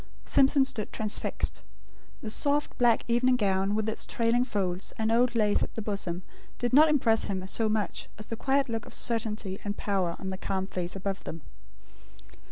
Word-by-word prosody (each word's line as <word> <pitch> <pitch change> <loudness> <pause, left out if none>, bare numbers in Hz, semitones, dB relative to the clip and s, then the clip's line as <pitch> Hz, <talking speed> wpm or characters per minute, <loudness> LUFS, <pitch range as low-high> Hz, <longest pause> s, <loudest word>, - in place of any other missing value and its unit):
Simpson 270 0 +4
stood 220 -6 -3
transfixed. 215 -1 -1 0.6
The 215 - 0
soft 290 +4 +1
black 240 -2 +4
evening 245 +2 +3
gown, 195 -2 +1
with 215 0 -1
its 220 - -2
trailing 235 +1 +2
folds, 190 -6 -2
and 220 0 0
old 240 +1 +3
lace 210 -2 +3
at - - -3
the 225 - -3
bosom, 190 -4 -2 0.3
did 245 +1 -2
not 310 +3 +7
impress 235 -7 +3
him 190 -2 -3
so 220 +3 +1
much 215 -3 -2
as 215 - -6
the 230 - -5
quiet 275 +3 +1
look 225 -2 -4
of - - -5
certainty 215 -4 -2
and 205 0 -3
power 190 -4 -1
on 190 - -5
the 190 0 -5
calm 190 -1 -2
face 180 -2 -4
above 195 0 -4
them. 165 -2 -7
220 Hz, 180 wpm, -28 LUFS, 195-240 Hz, 0.6 s, not